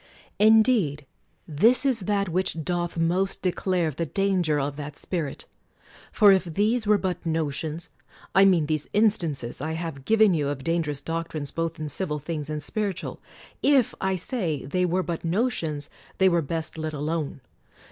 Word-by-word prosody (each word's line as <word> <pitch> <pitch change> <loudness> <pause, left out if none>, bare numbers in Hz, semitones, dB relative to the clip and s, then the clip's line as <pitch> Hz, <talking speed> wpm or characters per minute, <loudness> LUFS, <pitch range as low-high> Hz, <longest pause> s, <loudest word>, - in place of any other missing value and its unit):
Indeed 215 - +4 0.4
this 225 - +4
is 260 -4 +3
that 200 0 0
which 170 -2 -1
doth 175 0 -2
most 180 +4 0
declare 180 -2 0
the 165 +4 -3
danger 180 -5 +1
of 140 0 -2
that 145 0 -7
spirit. 160 -7 -4 0.7
For 205 -3 +6
if 190 -1 +3
these 210 +7 0
were 210 0 +5
but 185 -2 -3
notions, 160 0 -3 0.2
— - - -24
I 195 - +6
mean 180 -5 +4
these 155 -1 -2
instances 165 - 0
I 160 +2 -2
have 160 -5 -5
given 220 -3 +4
you 150 -4 0
of 140 -2 -4
dangerous 160 -4 -1
doctrines 165 -3 -4
both 165 -1 -3
in 155 - -3
civil 150 0 -1
things 150 0 -5
and 150 -1 -4
spiritual; 200 0 -3 0.4
if, 275 -5 +3
I 190 0 +1
say, 180 - -2
they 180 +6 0
were 185 +2 0
but 170 -2 -4
notions, 165 - -1 0.3
they 190 0 +5
were 170 -1 +2
best 160 +1 -4
let 155 0 -3
alone. 150 -1 -3
165 Hz, 165 wpm, -25 LUFS, 150-195 Hz, 0.7 s, For